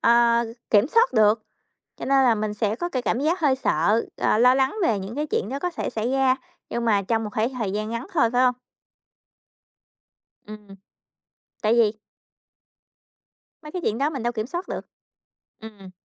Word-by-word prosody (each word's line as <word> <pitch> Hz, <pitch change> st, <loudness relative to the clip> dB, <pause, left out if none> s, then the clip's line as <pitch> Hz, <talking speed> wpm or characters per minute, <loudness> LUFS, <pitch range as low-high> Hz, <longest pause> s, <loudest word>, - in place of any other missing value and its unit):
ờ, 235 Hz, 0 st, +4 dB, 0.3 s
kiểm 210 Hz, +2 st, +5 dB
soát 465 Hz, +5 st, +3 dB
được. 215 Hz, -1 st, +3 dB, 0.6 s
Cho -, -, -6 dB
nên 270 Hz, 0 st, +4 dB
là 235 Hz, -3 st, +4 dB
mình 210 Hz, 0 st, -2 dB
sẽ 210 Hz, 0 st, -1 dB
có 345 Hz, +8 st, -3 dB
cái 255 Hz, -5 st, -2 dB
cảm 240 Hz, -, -1 dB
giác 325 Hz, +6 st, 0 dB
hơi 280 Hz, -4 st, +3 dB
sợ, 210 Hz, -2 st, +1 dB
ờ, -, -, +2 dB
lo 250 Hz, +2 st, +6 dB
lắng 265 Hz, +4 st, +1 dB
về 215 Hz, -8 st, +1 dB
những 195 Hz, +6 st, -7 dB
cái 300 Hz, +1 st, -2 dB
chuyện 205 Hz, -, -1 dB
đó 275 Hz, +2 st, -4 dB
có 360 Hz, -, -1 dB
thể -, -, -4 dB
xảy 230 Hz, +3 st, -2 dB
ra. 265 Hz, -1 st, +3 dB, 0.3 s
Nhưng 235 Hz, 0 st, -3 dB
mà 205 Hz, -3 st, +3 dB
trong 225 Hz, +3 st, -1 dB
một 210 Hz, -, -4 dB
thể 225 Hz, +3 st, +1 dB
thời 210 Hz, -5 st, -2 dB
gian 215 Hz, +1 st, -3 dB
ngắn 230 Hz, +7 st, -5 dB
thôi, 235 Hz, -8 st, +3 dB
phải 245 Hz, -, +2 dB
không? 250 Hz, -1 st, +2 dB, 1.9 s
Ừm. 215 Hz, 0 st, -11 dB, 1.0 s
Tại 215 Hz, -, +2 dB
vì 225 Hz, -3 st, +4 dB, 1.7 s
Mấy 300 Hz, -, -10 dB
cái 360 Hz, -2 st, -4 dB
chuyện 220 Hz, +3 st, -1 dB
đó 290 Hz, +3 st, +1 dB
mình 270 Hz, -6 st, -5 dB
đâu 240 Hz, +1 st, -1 dB
kiểm 220 Hz, 0 st, -3 dB
soát 350 Hz, +6 st, -5 dB
được. -, -, -4 dB, 0.8 s
Ừm. 205 Hz, -4 st, -12 dB
235 Hz, 190 wpm, -24 LUFS, 215-270 Hz, 1.9 s, lo